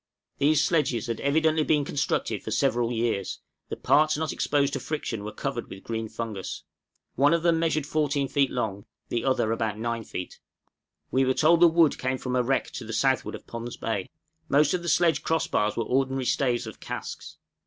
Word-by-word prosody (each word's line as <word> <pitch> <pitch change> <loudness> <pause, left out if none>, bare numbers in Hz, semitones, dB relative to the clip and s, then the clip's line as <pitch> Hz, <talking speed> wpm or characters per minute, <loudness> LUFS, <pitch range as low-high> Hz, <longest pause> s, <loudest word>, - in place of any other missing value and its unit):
These 150 +1 +4
sledges 150 -9 +1
had 115 -1 -3
evidently 155 +2 +2
been 150 -2 +2
constructed 140 - -1
for - - -6
several 120 0 +1
years, 115 -5 -1 0.3
the - - -3
parts 155 0 +3
not 160 -1 -2
exposed 140 -1 +1
to 135 - -1
friction 125 -7 -4
were 105 - -5
covered - - -4
with 95 - -10
green 115 -1 -4
fungus: 110 -5 -5 0.5
one 145 +5 +4
of 165 - -2
them 170 -1 +3
measured 160 -3 0
14 145 -2 0
feet 140 -1 +2
long, 105 -5 -3 0.2
the 120 - -1
other 130 -4 +1
about 110 -2 -1
9 115 0 -2
feet; 90 -3 -7 0.7
we 130 - +3
were 130 0 +2
told 165 +2 +4
the 175 - +8
wood 165 -3 +3
came 130 0 -1
from 125 0 -3
a 125 - +3
wreck 130 +2 0
to - - -6
the 115 +1 -6
southward 130 +4 +1
of - - -11
Pond's 115 +1 -6
Bay. 100 -5 -3 0.4
Most 145 +1 +4
of 180 - 0
the 170 - -3
sledge 170 -1 +3
cross 160 -1 0
bars 105 0 0
were 115 - +1
ordinary 135 +1 0
staves 125 -2 +1
of - - -9
casks. - - -7
135 Hz, 195 wpm, -26 LUFS, 115-155 Hz, 0.7 s, the